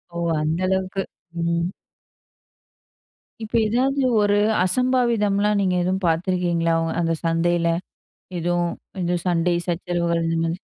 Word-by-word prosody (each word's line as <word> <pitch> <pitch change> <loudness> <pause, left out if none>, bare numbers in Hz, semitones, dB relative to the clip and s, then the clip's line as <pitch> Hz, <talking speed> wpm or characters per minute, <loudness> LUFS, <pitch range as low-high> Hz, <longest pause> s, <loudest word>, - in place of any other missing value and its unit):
ஓ! - - -3 0.2
அந்த 155 +3 0
அளவுக்கு. 190 +1 -1 0.4
ம். 170 +1 0 1.7
இப்ப 220 - -5
ஏதாவது 265 +5 +1 0.2
ஒரு 205 0 +3 0.3
அசம்பாவிதம்லாம் 210 -2 +2
நீங்க 185 -2 +1
எதுவும் 190 +2 0
பார்த்துருக்கீங்களா, 170 -1 +1 0.3
அந்த 165 -1 +1
சந்தையில? 170 +1 +1 0.7
எதுவும் 175 0 0 0.3
இது 175 0 0
சண்டை 175 0 +2
சச்சரவுகள் 170 -1 -1
இந்த 165 0 0
மாதிரி. 165 +2 -2
175 Hz, 105 wpm, -22 LUFS, 170-200 Hz, 1.7 s, ஒரு